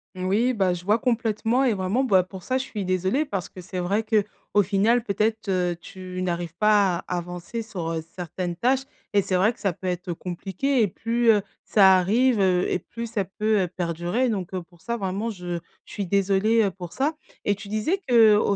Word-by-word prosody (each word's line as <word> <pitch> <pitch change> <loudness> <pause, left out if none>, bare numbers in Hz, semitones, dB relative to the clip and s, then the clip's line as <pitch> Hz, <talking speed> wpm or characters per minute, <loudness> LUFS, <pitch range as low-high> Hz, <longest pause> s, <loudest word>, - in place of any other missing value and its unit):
Oui, 205 +7 +1
bah, 190 -4 +1
je 175 0 -9
vois 210 +3 +3
complètement 230 +1 +1
et 245 -5 +3
vraiment, 195 +7 0
bah, 195 -7 +4
pour 185 0 -10
ça 260 +6 0
je - - -2
suis 205 -3 -5
désolée 185 - +1
parce 195 - -4
que 185 - -10
c'est 185 +1 -5
vrai 200 +5 0
qu'au 210 -1 0
final 210 +5 +2
peut-être, 215 0 -1
heu, 180 -2 +1
tu 185 -1 -7
n'arrives 175 -2 -2
pas 205 -4 +4
à 180 - -1
avancer 180 +6 -5
sur, 180 -7 -5
heu, 160 -1 -3
certaines 175 0 -4
tâches 255 +7 +1 0.3
et 200 -1 +4
c'est 190 -1 -1
vrai 215 +6 +3
que - - -25
ça 195 -4 0
peut 185 - -7
être 180 0 -2
compliqué 195 +10 -1
et 210 - +3
plus, 230 +4 +2
heu, 210 - +3 0.2
ça 190 -3 +6
arrive, 225 +6 +3
heu, 185 -2 +2
et - - +1
plus 235 +5 -7
ça 215 -4 -2
peut, 215 +2 +1
heu, 180 - -1
perdurer 175 +7 -1
donc 195 -5 -3
heu, 185 - -2
pour 170 -1 -20
ça 235 0 -3
vraiment 200 +3 -2
je 180 -3 -4 0.3
je - - -13
suis 200 - -2
désolée, 200 +4 +2
heu, 205 - +2
pour 180 -2 -9
ça 295 +4 0 0.3
et 205 - +1
tu 205 +1 -10
disais 215 - 0
qu'au 215 -4 +5
200 Hz, 215 wpm, -25 LUFS, 180-225 Hz, 0.3 s, ça